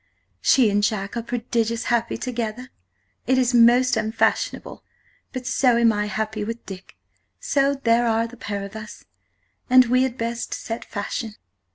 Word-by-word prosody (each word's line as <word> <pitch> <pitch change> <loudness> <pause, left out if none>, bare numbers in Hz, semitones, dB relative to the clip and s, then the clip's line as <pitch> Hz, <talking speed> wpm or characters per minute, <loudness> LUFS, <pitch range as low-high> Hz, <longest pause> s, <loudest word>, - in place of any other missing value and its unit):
"She 240 -6 +4
and 205 +1 +2
Jack 205 -1 -1
are 235 - -2
prodigious 230 -1 -2
happy 235 -1 0
together; 245 0 -4 0.6
it 260 +1 +3
is 250 -1 +2
most 245 +2 +5
Unfashionable, 220 +2 -1 0.5
but 255 -1 -6
so 250 -1 +2
am 230 -1 +4
I 210 0 -1
happy 215 +1 -3
with 230 +2 -6
Dick, 190 -1 -11 0.4
so 280 0 +1
there 240 -3 +2
are 225 0 +2
a - - -3
Pair 205 -4 -5
of 200 +2 -9
us, 215 -1 -10 0.6
and 255 0 +7
we 250 +2 +2
had 260 -1 -1
best 235 0 -3
sett 225 +1 -5
Fashion. 215 +1 -5
230 Hz, 160 wpm, -23 LUFS, 215-245 Hz, 0.6 s, and